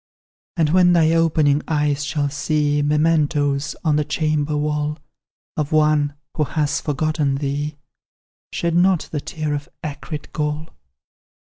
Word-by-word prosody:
"And 155 -3 +2
when 180 0 +5
thy 160 -2 +4
opening 155 -3 +3
eyes 145 -2 0
shall 145 0 -1
see 145 0 0
Mementos, 150 -2 +1
on 150 -2 +3
the 150 - +2
chamber 150 0 0
wall, 150 0 -1 0.6
Of 150 0 -2
one 150 -2 +3 0.2
who 155 - +1
has 150 0 -1
forgotten 150 -1 0
thee, 145 +1 -3 0.7
Shed 170 -1 -1
not 180 0 +3
the 150 - -2
tear 155 0 -3
of 145 0 -4
acrid 150 0 -6
gall. 150 +1 -2
150 Hz, 130 wpm, -21 LUFS, 145-155 Hz, 0.7 s, when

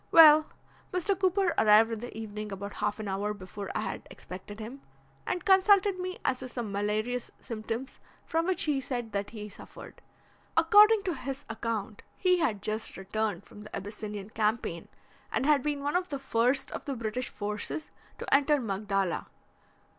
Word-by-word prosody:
Well, 310 -1 +9 0.4
Mr. 365 +2 +1
Cooper 375 -1 +2
arrived 220 +1 +6
in 225 - -3
the 240 0 -7
evening 215 -1 -5
about 200 +1 -5
half 210 +1 -2
an 215 - -4
hour 200 +2 -1
before 200 +1 -7
I - - 0
had - - -5
expected 190 +3 -9
him, 240 +6 -7 0.5
and 360 - -2
consulted 385 0 +5
me 370 0 -4
as 255 - +1
to 255 - -6
some 235 -4 -4
malarious 215 +4 -1
symptoms 230 +2 -5 0.3
from 330 +1 0
which 375 - +1
he 290 -3 +1
said 245 -3 -4
that 200 0 -2
he 210 -2 -7
suffered. 205 - -12 0.6
According 425 0 +7
to 370 -3 -1
his 275 -1 -5
account 220 -2 -3 0.2
he 365 -1 +3
had 230 - 0
just 215 +1 -3
returned 210 +2 -2
from 210 - -13
the 210 - -8
Abyssinian 205 0 -6
Campaign, 215 -6 -1 0.4
and - - 0
had 295 -2 +5
been 290 0 -2
one 290 +3 -1
of 360 0 +1
the 285 - -2
first 260 0 +1
of - - -6
the 275 - -2
British 235 +2 -3
forces 210 +8 -4 0.3
to - - -3
enter 290 +1 +5
Magdala. 195 -4 -1
230 Hz, 170 wpm, -29 LUFS, 210-300 Hz, 0.6 s, Well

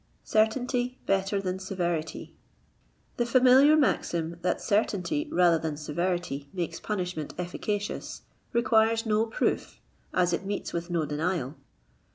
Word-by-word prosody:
CEftTAlNTT 245 +3 +1
BETTER 195 +1 +1
THAN 185 -1 -3
SEVERITY. 175 -4 -3 0.8
The 240 - +1
familiar 260 +5 +6
maxim 170 - 0
that 180 0 0
certainty 220 - 0
rather 175 -2 +4
than 155 -2 -3
severity 155 -2 -2
makes 175 -4 -3
punishment 180 -7 -4
efficacious, 205 +3 -4 0.3
requires 225 -1 +3
no 220 +1 +2
proof, 225 - -1 0.3
as 175 -1 +2
it 170 - -1
meets 200 +1 -4
with 170 +1 -3
no 170 -3 0
denial. 150 -1 -2
185 Hz, 120 wpm, -28 LUFS, 170-220 Hz, 0.8 s, familiar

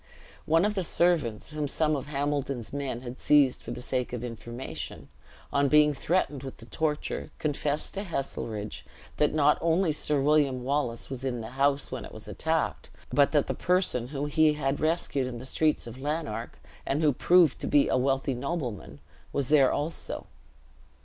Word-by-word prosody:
One 165 +4 +4
of 210 - +1
the 190 -3 -1
servants, 160 -11 +1
whom 150 -1 -2
some 155 +2 +1
of 140 0 -4
Hambledon's 140 -4 -2
men 135 -4 -3
had 125 0 -8
seized 145 -4 +4
for - - -10
the 125 - -5
sake 125 -1 -2
of 120 -1 -4
information, 120 +1 -7 0.4
on 140 0 +3
being 150 +1 +5
threatened 150 -2 0
with 135 -1 -8
the 115 - -12
torture, 150 +3 -2
confessed 150 0 -1
to 200 - -3
Heselrigge, 115 - -4 0.4
that 150 - +3
not 150 -1 +3
only 170 +1 +2
Sir 150 -1 +1
William 140 -3 +2
Wallace 130 -3 -1
was 130 -1 -4
in 125 -3 -2
the 110 - -6
house 140 +2 +1
when - - -4
it - - -10
was - - -8
attacked, - - -1 0.2
but 140 -1 +4
that 145 -2 +3
the - - -2
person 180 -10 +1
whom 140 +1 -3
he 155 +1 +4
had 140 -1 -1
rescued 155 -5 0
in 125 -2 -5
the 125 - -8
streets 155 +3 +1
of 120 +2 -9
Lanark, 145 -6 -3 0.3
and 145 +4 -1
who 150 -2 +4
proved 170 +1 +4
to - - -2
be 145 - +4
a - - +1
wealthy 135 +1 +1
nobleman, 125 - -4 0.3
was 140 -3 -1
there 140 -4 +5
also. 155 +3 -3
140 Hz, 180 wpm, -28 LUFS, 130-155 Hz, 0.4 s, being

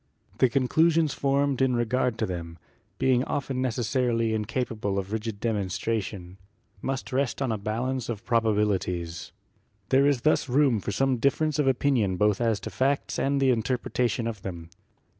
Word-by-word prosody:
The 130 - +5
conclusions 155 +4 +2
formed 140 -1 +1
in 130 -2 +3
regard 120 0 0
to 110 - 0
them, 85 -3 -6 0.4
being 130 -1 +2
often 135 -2 -2
neces 125 -1 -1
sarily 115 -2 +1
incapable 110 -2 -2
of 100 +1 -3
rigid 110 -1 -3
demonstration, 100 -3 -3 0.4
must 135 0 -4
rest 135 0 0
on 135 -4 0
a - - 0
49 - - -4
50 105 +1 -4
GEOLOGY 110 - -2
balance 130 -2 -2
of 110 -4 -5
probabilities. 100 -7 0 0.6
There 135 +1 +4
is 140 -4 +2
thus 155 -1 +2
room 130 -3 +3
for 105 - -4
some 135 +2 +1
difference 150 +4 +1
of 145 - +2
opinion 125 -8 +2
both 105 +2 +2
as 115 -3 +1
to 110 - -6
facts 130 +8 0
and 140 +1 +1
the 135 -1 +4
interpreta 120 +1 0
tion 115 +1 -2
of 110 -4 -4
them. 85 -3 -7
120 Hz, 175 wpm, -26 LUFS, 105-135 Hz, 0.6 s, The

